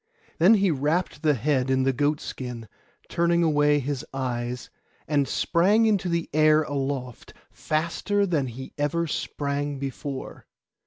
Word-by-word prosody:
Then 185 +7 +7
he 195 -3 +2
wrapped 150 +5 -1
the 150 -3 +3
head 130 +1 0
in 130 0 +2
the 135 0 +2
goat 145 +3 +1
skin, 120 -3 -7 0.4
turning 170 0 +2
away 145 -2 +3
his 140 -1 -3
eyes, 125 -2 -3 0.4
and 145 -2 +1
sprang 190 - +3
into 200 -4 +1
the 170 -1 -1
air 155 0 +5
aloft, 135 -4 -4 0.2
faster 170 +6 -1
than 155 -8 0
he 130 +2 -8
ever 160 +3 0
sprang 145 -2 -3
before. 135 0 -6
145 Hz, 140 wpm, -25 LUFS, 135-170 Hz, 0.4 s, Then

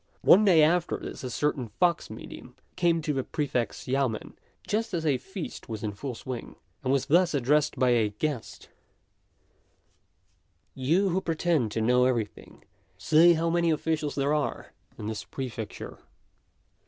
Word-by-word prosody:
] - - -40
One 210 - +6
day 170 -6 +6
after 170 +2 +2
this - - -8
a 130 - -3
certain 140 -2 -1
fox 170 - 0
medium 120 +3 -10 0.2
came 170 -2 +2
to 150 - -1
the 135 -1 -1
Prefect's 135 -6 -2
yamên 130 -4 -1 0.3
just 215 -2 -1
as 165 -1 -2
a 140 -4 +2
feast 190 - -8
was 110 -1 -5
in 105 - -1
full 125 +5 -6
swing, 125 0 -7 0.3
and 130 - 0
was 135 -1 +1
thus 175 +1 +3
addressed 145 +3 +2
by 125 -1 +3
a 115 -3 +3
guest: 125 +4 -4 2.0
"You 165 +10 +1
who 185 +2 0
pretend 160 - 0
to 110 - -1
know 125 +3 +4
everything, 120 -5 -3 0.3
say 170 +3 +5
how 165 0 0
many 170 0 +2
officials 155 -2 -1
there 140 +1 +1
are 150 -1 -2 0.2
in 105 - -7
this 110 0 -4
Prefecture." 115 -6 -7
145 Hz, 155 wpm, -27 LUFS, 125-165 Hz, 2.0 s, One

